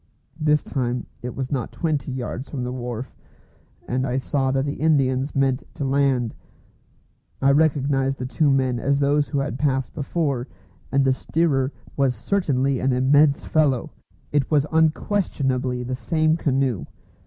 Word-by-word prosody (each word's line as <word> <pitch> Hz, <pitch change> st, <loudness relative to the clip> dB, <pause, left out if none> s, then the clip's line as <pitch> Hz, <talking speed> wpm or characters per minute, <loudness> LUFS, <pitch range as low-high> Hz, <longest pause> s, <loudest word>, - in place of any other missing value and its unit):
This 150 Hz, -1 st, +2 dB
time 125 Hz, -2 st, -2 dB, 0.2 s
it 125 Hz, 0 st, -5 dB
was 130 Hz, -1 st, -4 dB
not 130 Hz, -5 st, -2 dB
twenty 150 Hz, -6 st, -2 dB
yards 130 Hz, +1 st, -5 dB
from 130 Hz, -4 st, -4 dB
the 125 Hz, -, -3 dB
wharf, 125 Hz, -1 st, -5 dB, 0.7 s
and 130 Hz, +2 st, 0 dB
I 125 Hz, +1 st, -1 dB
saw 135 Hz, 0 st, 0 dB
that 135 Hz, +1 st, +1 dB
the 145 Hz, -1 st, -4 dB
Indians 135 Hz, -3 st, +2 dB
meant 135 Hz, -1 st, +1 dB
to 140 Hz, -, -3 dB
land. 135 Hz, -4 st, +1 dB, 1.1 s
I 135 Hz, +1 st, +4 dB
recognised 140 Hz, -2 st, +2 dB
the 125 Hz, -, -4 dB
two 145 Hz, +3 st, +1 dB
men 130 Hz, -3 st, +2 dB
as 140 Hz, +3 st, +1 dB
those 145 Hz, +1 st, +2 dB
who 145 Hz, -, -2 dB
had 135 Hz, -2 st, -2 dB
passed 135 Hz, -3 st, 0 dB
before, 140 Hz, -4 st, -1 dB, 0.4 s
and 135 Hz, 0 st, +3 dB
the 135 Hz, -, +4 dB
steerer 140 Hz, -2 st, 0 dB, 0.2 s
was 135 Hz, -3 st, +2 dB
certainly 135 Hz, -, 0 dB
an 130 Hz, 0 st, +1 dB
immense 140 Hz, +3 st, +4 dB
fellow. 145 Hz, -6 st, +1 dB, 0.4 s
It 145 Hz, -2 st, +1 dB
was 150 Hz, -2 st, +3 dB
unquestionably 145 Hz, -6 st, +1 dB
the 125 Hz, +1 st, -4 dB
same 155 Hz, +4 st, +1 dB
canoe. 135 Hz, -, 0 dB
135 Hz, 155 wpm, -23 LUFS, 130-145 Hz, 1.1 s, I